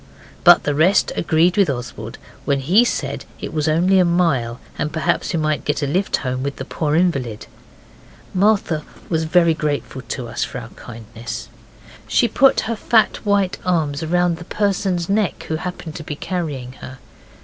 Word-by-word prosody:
But - - +7
the 145 - 0
rest 170 +7 +3
agreed 170 +3 +2
with 200 -6 +4
Oswald 125 -2 -5 0.3
when 140 -1 +1
he 185 - +5
said - - -2 0.2
it - - -6
was 155 -1 0
only 180 +5 +3
a - - +6
mile, 165 -10 +1 0.2
and 150 - -2
perhaps 170 +2 0
we - - 0
might 155 -5 0
get 150 0 -1
a - - +2
lift 185 +8 0
home 130 0 -2
with 140 +1 -3
the 130 - -6
poor 150 +1 -1
invalid. 135 -11 0 0.9
Martha 190 -5 +2 0.3
was 160 -1 0
very 170 0 +4
grateful 145 -3 -3
to 125 -2 -5
us 115 - -2
for - - -5
our 120 -2 -7
kindness. 115 0 -8 0.6
She 240 - +3
put 265 +4 +4
her 230 - -2
fat 220 0 +2
white 200 -2 +1
arms 160 -5 0
round 175 +1 +1
the 175 - -10
person's 190 -3 0
neck 200 -6 0
who 160 - 0
happened 180 -1 -6
to 160 - -7
be 150 - -5
carrying 150 -8 -4
her. 130 - -9
160 Hz, 175 wpm, -20 LUFS, 140-180 Hz, 0.9 s, But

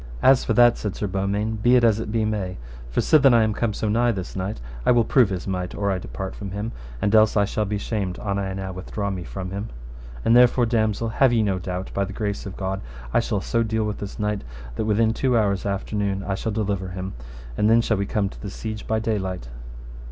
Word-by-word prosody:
As 135 -1 +6
for - - 0
that, 120 -1 +5
said 105 -3 -3
Sir - - -2
Beaumains, 100 +3 -1
be 120 +3 +5
it 125 - +4
as 110 -2 +4
it 110 - -4
be 110 -1 +1
may. 100 -4 -2 0.3
For - - +1
sithen 140 -5 +5
I 115 - +5
am 110 -1 +1
come 115 +1 0
so 110 - -3
nigh 120 +3 +3
this 95 -5 -5
knight 95 +2 -3 0.2
I - - +1
will 120 -1 +5
prove 120 -1 +4
his 95 -3 -4
might 90 -2 -3
or 100 -1 0
I 95 - -1
depart 95 +1 -6
from 100 - -6
him, 105 +4 -4 0.3
and 100 - 0
else 110 -1 +5
I 100 - +4
shall 105 +1 -1
be 105 +1 -2
shamed 100 -3 -3
an 100 -1 -2
I 95 -1 -2
now 95 0 -4
withdraw 100 +2 -4
me 90 -2 -4
from 95 +1 -6
him. 100 +3 -4 0.6
And 115 - +5
therefore, 125 0 +6
damosel, 110 -1 0
have 130 +3 +3
ye 115 -2 +3
no 95 -3 0
doubt 90 +1 -4
by 100 - +1
the 100 +1 -5
grace 100 -1 -3
of 95 - -8
God 95 0 -3 0.3
I - - +5
shall 105 -4 -1
so 115 +5 0
deal 110 -1 0
with 105 -1 -3
this 100 -1 -6
knight 105 -1 -1 0.3
that - - -1
within 110 +1 +2
two 125 0 +1
hours 100 -3 +1
after 100 +2 -3
noon 100 -1 -1
I 100 - -2
shall 105 +3 -2
deliver 100 -3 -1
him. 95 +1 -5 0.4
And 105 - +2
then 115 +1 +6
shall 110 -2 +1
we 100 0 -1
come 100 -1 0
to - - -12
the 100 - -5
siege 110 +2 -6
by 110 - +1
daylight. 95 - -2
105 Hz, 250 wpm, -24 LUFS, 95-110 Hz, 0.6 s, As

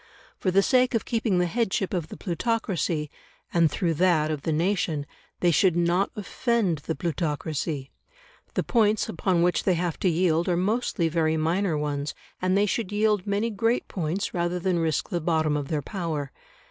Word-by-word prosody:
For 185 - 0
the 195 +2 +4
sake 255 0 +3
of 225 - 0
keeping 225 -5 0
the 180 - +3
headship 195 -1 -1
of 170 -4 -1
the - - -9
plutocracy, 180 -6 -1 0.4
and 170 -2 +4
through 170 0 0
that 155 -2 +2
of 150 -2 -3
the 160 - -1
nation, 160 -3 0 0.4
they 175 - +4
should 175 +2 +3
not 175 +3 +2
offend 210 - 0
the 160 +3 -4
plutocracy; 150 -4 -2 0.6
the - - +1
points 215 -3 +2
upon 170 0 +1
which 175 0 +2
they 185 - +2
have 170 -1 -2
to 185 - +2
yield 170 0 +2
are 175 - +2
mostly 195 -2 0
very 160 -1 +1
minor 165 +2 +1
ones, 145 -1 -2 0.3
and 185 +1 +2
they 205 - +4
should 210 -1 -2
yield 210 -2 +1
many 205 +3 0
great 225 +4 0
points 180 +2 -2
rather 175 0 0
than 180 -1 0
risk 160 -2 0
the 175 -4 -1
bottom 155 -2 +1
of 145 -2 -2
their 150 -1 -2
power. 160 -8 -3
175 Hz, 180 wpm, -26 LUFS, 160-200 Hz, 0.6 s, the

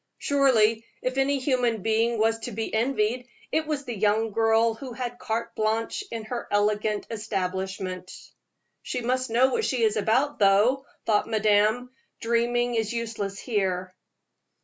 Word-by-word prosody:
Surely, 230 -6 +3 0.2
if 255 +1 -1
any 280 +1 +2
human 250 -6 0
being 225 +1 +1
was 225 +1 +2
to 245 - -6
be 225 +1 -4
envied, 240 +1 0 0.2
it 315 -1 0
was 295 -3 -2
the 240 -3 -4
young 215 +2 +1
girl 225 +1 +3
who 250 +2 -8
had 245 0 -5
carte 225 +1 -3
blanche 220 - -1
in 225 -1 -5
her 240 +2 -5
elegant 210 0 +1
establishment. 190 -3 -3 0.7
"She 250 - -4
must 255 +1 -1
know 250 +3 +3
what 450 - 0
she 250 - 0
is 215 -1 +2
about, 255 +8 +1
though," 215 +7 +4 0.2
thought 210 -2 +2
madame. 215 +3 +2 0.3
"Dreaming 240 +1 +1
is 220 -2 0
useless 225 -4 -3
here." 185 -6 -2
225 Hz, 150 wpm, -26 LUFS, 210-245 Hz, 0.7 s, though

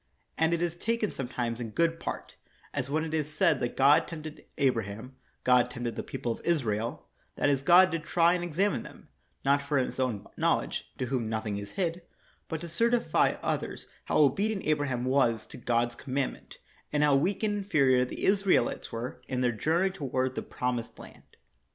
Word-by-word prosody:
And 160 +1 +2
it 170 0 +1
is 170 0 -2
taken 225 +1 -1
sometimes 120 -2 -3
in 115 - -4
good 165 +8 +1
part, - - -6 0.4
as 140 -1 -2
when 155 +2 0
it 160 -1 -5
is 155 -1 -1
said 150 - +3
that 120 - -3
God 140 +2 +5
tempted 155 -2 -8
Abra 130 -6 +2
ham, 110 +6 -9 0.3
God 125 -1 +4
tempted 120 -1 -4
the - - -3
people 120 - -4
of - - -5
Israel; 120 -6 -1 0.3
that - - +2
is, 135 -1 +1
God 180 +5 +6
did 165 -1 -2
try 170 +1 +3
and 180 -1 -1
examine 180 +4 0
them, - - -13 0.4
not 140 +1 +4
for 140 +1 -1
his 130 0 -1
own 125 -6 -1
knowledge, - - 0
to 130 - -1
whom 120 -3 -2
nothing 110 -2 -2
is 100 - -8
hid, 175 -2 -1 0.5
but 160 -2 -4
to 170 - -6
certify 230 +8 +2
others - - -2 0.2
how - - 0
obedient 195 +9 +2
Abraham 145 -5 0
was 120 -4 +2
to - - -11
God's 120 0 0
com 130 +2 -7
mandment, 140 -2 -3 0.4
and 150 0 +2
how 145 -2 +5
weak 185 +10 +1
and 205 -1 +1
inferior 140 -10 +3
the 125 - -6
Isra 195 -1 +4
elites 120 - -1
were 115 +2 -5
m 130 -1 -1
their 125 -1 +3
journey 165 - +1
toward 130 -6 -2
the - - -3
promised 125 -2 -3
land. - - -15
140 Hz, 195 wpm, -29 LUFS, 125-170 Hz, 0.5 s, God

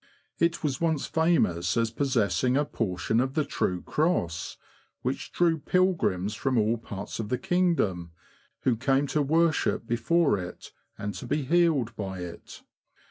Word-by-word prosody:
It 170 0 +1
was 145 -2 -1
once 160 -4 +1
famous 90 - +1
as 115 -1 +1
possessing 125 - +1
a 145 - +2
portion 110 -1 -1
of 130 +1 -1
the 155 - +1
true 90 -1 -1
Cross, 150 - -1 0.5
w^hich - - -2
drew 165 -2 +2
pilgrims 160 - +1
from 130 +4 -1
all 110 +1 +2
parts 105 -1 -7
of 105 -2 -3
the 125 - 0
kingdom, 155 - +1 0.5
who 125 - +2
came 135 +4 +1
to 150 +2 0
worship 160 -2 +2
before 120 - +2
it, 90 -1 -8 0.3
and 105 0 -4
to 95 +7 -7
be 145 +3 0
healed 150 -6 +2
by 95 -3 -5
it. 85 -1 -9
125 Hz, 150 wpm, -27 LUFS, 100-160 Hz, 0.5 s, a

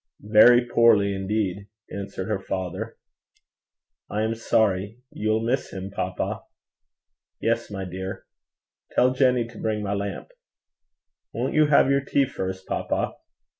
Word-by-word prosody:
'Very 120 +4 +6
poorly 115 -4 +4
indeed,' 100 0 -2 0.2
answered 100 -1 -5
her 105 -3 -1
father. 95 -2 -4 1.1
'I 105 - -1
am 110 +1 0
sorry. 105 -2 +1
You'll 110 +1 0
miss 125 +3 -1
him, 95 0 -6
papa.' - - -3 1.0
'Yes, 115 +1 0
my 95 -2 -5
dear. 95 +1 -6 0.7
Tell 125 +1 +4
Jenny 125 -3 +2
to 115 -1 -12
bring 110 -1 -1
my 100 0 -1
lamp.' 100 - -4 1.0
'Won't - - -1
you 155 -1 +4
have 140 -2 +5
your 140 0 +3
tea 140 0 +2
first, 95 -5 -5
papa?' - - -2
105 Hz, 130 wpm, -25 LUFS, 95-115 Hz, 1.1 s, Very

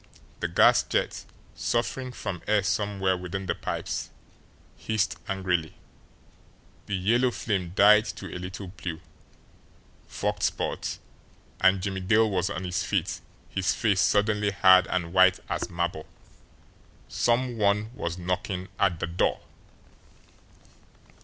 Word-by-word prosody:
The - - -1
gas - - +5
jet, - - -2 0.3
suffering 125 +2 -2
from 95 -7 -5
air 105 -1 +3
somewhere 100 -2 0
within 90 +2 -5
the 85 - 0
pipes, - - -4 0.7
hissed 110 -4 -1
angrily, 90 -4 -1 1.1
the 100 - -1
yellow 115 +7 +2
flame 95 -7 -3
died 105 +2 +6
to 105 - -7
a - - -4
little 95 +1 -7
blue, 85 -3 -6 1.1
forked - - -3
spurt - - -2 0.6
and 95 0 +4
Jimmie 95 -1 -2
Dale 110 +4 +3
was 95 -3 0
on 90 - -4
his 90 0 -2
feet, - - -1 0.3
his 95 -1 0
face 105 -6 +2
suddenly 105 +3 +2
hard 95 -2 +6
and 85 -2 -2
white 95 0 +5
as - - -3
marble. 85 -2 -3 1.0
SOME 120 0 0
ONE 105 +2 +1
WAS 85 -8 -4
KNOCKING 90 +1 -3
AT 90 -4 +2
THE - - -1
DOOR! 85 +1 0
95 Hz, 125 wpm, -27 LUFS, 90-105 Hz, 1.1 s, died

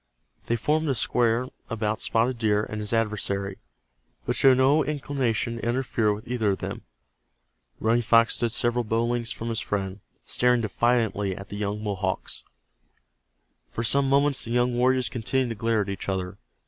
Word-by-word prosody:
They 120 - +1
formed 155 +6 0
a 135 - +1
square 120 +2 +1 0.2
about 110 -2 -2
Spotted 120 +2 +2
Deer 105 -2 +2
and 110 0 -5
his 105 - -4
adversary, 100 -3 -1 0.7
but - - -1
showed 130 -2 +5
no 140 +4 +4
inclination 135 -5 -1
to - - -8
interfere 120 -3 0
with 105 +1 -5
either 115 -5 +1
of - - -4
them. - - -5 1.0
Running 115 +2 +2
Fox 115 0 +4
stood 120 -1 +1
several 120 +1 +1
bow 115 +1 0
lengths 120 -1 -1
from 115 0 -4
his 115 -1 -1
friend, 95 -1 -3 0.3
staring 125 -1 +2
defiantly 110 -3 0
at 100 0 -9
the - - -6
young 105 +1 -3
Mohawks. 95 -2 -3 1.3
For 115 - -4
some 135 +4 +3
moments 140 0 +2
the - - -8
young 120 +1 +2
warriors 130 +1 +2
continued 130 +1 -1
to 115 - -4
glare 115 0 +1
at 100 - -4
each 100 0 -4
other. 95 0 -3
115 Hz, 170 wpm, -25 LUFS, 105-125 Hz, 1.3 s, showed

